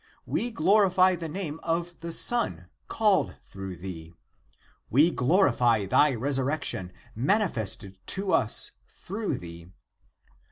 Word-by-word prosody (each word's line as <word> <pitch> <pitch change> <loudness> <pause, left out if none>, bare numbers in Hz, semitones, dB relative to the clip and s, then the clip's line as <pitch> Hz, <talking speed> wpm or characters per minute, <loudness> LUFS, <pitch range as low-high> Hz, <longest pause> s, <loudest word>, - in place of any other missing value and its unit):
We 240 - -1
glorify 185 -1 +4
the 165 -2 -6
name 160 -2 -5
of 170 +1 -3
the 170 +1 -6
Son 90 - +1 0.2
called 210 -4 +1
through 95 -1 -8
thee. 85 -2 -9 0.7
We 150 +8 +4
glorify 125 - +2
thy 140 +8 +3
resurrection 135 -6 -1 0.2
manifested 115 - -1
to 195 0 -1
us 115 -3 +2 0.2
through 205 +3 -4
thee. 85 -1 -10
150 Hz, 110 wpm, -27 LUFS, -, 0.7 s, glorify